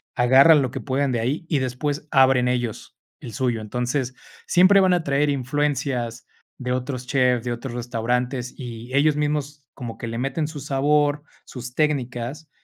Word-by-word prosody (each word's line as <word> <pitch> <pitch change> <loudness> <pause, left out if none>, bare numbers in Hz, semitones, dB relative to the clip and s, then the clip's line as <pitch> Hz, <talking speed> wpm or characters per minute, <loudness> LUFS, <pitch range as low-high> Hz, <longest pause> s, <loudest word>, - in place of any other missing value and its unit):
agarran 135 +5 +6
lo 130 - -2
que - - -5
puedan 135 0 -1
de 120 - 0
ahí 130 +8 -2
y 150 - +2
después 140 +4 -3
abren 130 -2 +4
ellos 120 -3 -3 0.2
el 115 - -9
suyo. 120 0 -1
Entonces, 125 +4 -2 0.3
siempre 185 +3 +6
van 185 -1 +4
a 175 - +1
traer 145 +1 +1
influencias 135 -3 -1 0.4
de 125 0 -1
otros 125 0 -4
chefs, 125 -3 +2
de 120 - -1
otros 120 +1 -6
restaurantes 125 +1 -2
y 120 -1 -8
ellos 145 +2 +3
mismos 150 -1 -2
como 120 -4 -7
que 115 - -6
le 115 0 -4
meten 135 +5 -1
su 150 -1 -6
sabor, 145 +1 +1 0.2
sus 125 -1 -8
técnicas 140 0 -2
130 Hz, 165 wpm, -23 LUFS, 125-145 Hz, 0.4 s, agarran